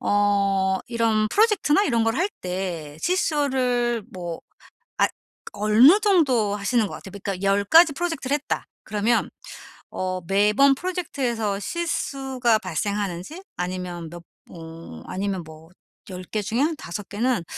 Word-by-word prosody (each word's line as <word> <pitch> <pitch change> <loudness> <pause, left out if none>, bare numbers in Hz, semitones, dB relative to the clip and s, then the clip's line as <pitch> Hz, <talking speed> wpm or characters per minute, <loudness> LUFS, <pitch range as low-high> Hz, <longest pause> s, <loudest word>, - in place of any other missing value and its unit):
어 200 -2 +2
이런 225 -2 +1
프로젝트나 415 - +3
이런 230 -5 +1
걸 225 +1 +1
할 370 +5 +1
때 180 -5 -4
실수를 260 - +1
뭐 175 -3 -6 0.6
아 - - +5 0.5
어느 215 - +6
정도 275 - +3
하시는 215 +2 +1
것 - - -8
같아요? 190 - -10
그러니까 195 -1 -4
10 200 +1 +2
가지 325 - +6
프로젝트를 290 -4 -2
했다 295 - -3 0.2
그러면 215 +3 0 0.6
어 185 0 -3
매번 210 +8 +4
프로젝트에서 260 - -2
실수가 265 - -1
발생하는지 205 - -3
아니면 180 -2 -4
몇 175 0 -10 0.3
어 165 - -10
아니면 190 -1 -3
뭐 160 +1 -14 0.4
10 185 0 -7
개 215 +3 -3
중에 220 +4 -2
한 315 +3 +2
5 205 - -7
개는 225 -1 0
215 Hz, 265 characters per minute, -24 LUFS, 190-270 Hz, 0.6 s, 어느